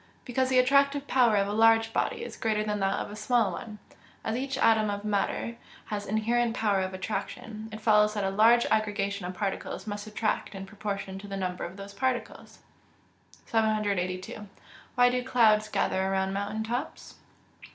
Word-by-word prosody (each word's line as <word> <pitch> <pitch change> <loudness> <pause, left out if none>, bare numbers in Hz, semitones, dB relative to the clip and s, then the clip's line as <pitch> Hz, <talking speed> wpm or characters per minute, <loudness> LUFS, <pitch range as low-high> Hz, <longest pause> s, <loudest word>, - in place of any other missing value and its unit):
_ - - -34
Because 255 +1 0
the 260 - +3
attractive 280 +2 +4
power 245 -4 +4
of 200 -1 +2
a 205 - -2
large 225 +1 +4
body 465 -1 -1
is - - -7
greater 215 -1 0
than 210 -1 -2
that 195 0 +1
of - - -4
a - - -7
small 215 -1 +1
one. 210 +4 -7 0.5
As 220 - -2
each 270 +2 -2
atom 220 -3 +4
of 205 0 -4
matter 210 +3 -1 0.4
has 205 0 -3
inherent 230 +2 +1
power 205 -3 +2
of 185 0 -3
attraction, 215 +3 -5
it 215 0 -8
follows 210 -1 +4
that 205 - -1
a 195 - 0
large 230 +4 +5
aggregation 200 -3 0
of 180 - -6
particles 195 0 -3
must 205 0 -5
attract 215 -1 -2
in 195 0 -6
proportion 200 -2 -5
to 205 - -10
the 195 0 -5
number 180 -1 -3
of 175 +3 -9
those 200 0 -9
particles. 255 +1 -3 0.9
782. 205 -3 -1 0.5
_Why 245 0 +6
do 250 0 -1
clouds 220 -4 +3
gather 190 - 0
around 190 0 0
mountain 205 +2 -2
tops? 240 +6 -5
215 Hz, 180 wpm, -28 LUFS, 200-230 Hz, 0.9 s, Why